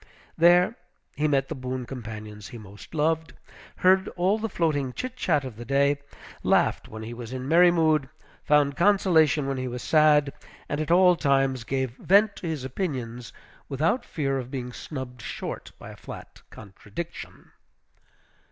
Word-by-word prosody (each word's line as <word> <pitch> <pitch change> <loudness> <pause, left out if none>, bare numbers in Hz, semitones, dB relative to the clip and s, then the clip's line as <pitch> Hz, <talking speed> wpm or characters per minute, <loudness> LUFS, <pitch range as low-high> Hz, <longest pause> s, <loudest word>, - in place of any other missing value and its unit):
There 175 +6 +5 0.4
he 150 +1 +1
met 135 -2 +1
the - - -4
boon 130 -1 -5
companions 110 -4 -8
he 120 - -9
most 105 +7 -12
loved; 160 +1 0 0.4
heard 190 +1 +4
all 190 +5 +2
the 225 +1 -3
floating 145 -8 -1
chitchat 190 - -1
of 130 -5 -8
the 120 - -7
day; 140 +3 +2 0.4
laughed - - +2
when 110 0 -8
he 115 +2 -6
was 120 -1 -8
in 130 0 -5
merry 175 +3 +6
mood; 155 -5 +2 0.3
found 145 -1 +3
consolation 170 -6 +3
when 135 0 -2
he 130 0 -3
was 125 0 -5
sad; 150 -2 +4 0.3
and 145 +1 -2
at 155 - -4
all 180 +1 +6
times 135 -5 +1
gave 130 0 -2
vent 200 +3 +4
to 175 - -6
his 155 -5 -3
opinions, 125 -6 -4 0.4
without 155 - 0
fear 135 -3 -2
of 125 -1 -7
being 125 -2 -5
snubbed 130 -5 -7
short - - -6
by - - -10
a - - -11
flat - - -11
contradiction. 100 - -9
140 Hz, 160 wpm, -26 LUFS, 125-165 Hz, 0.4 s, merry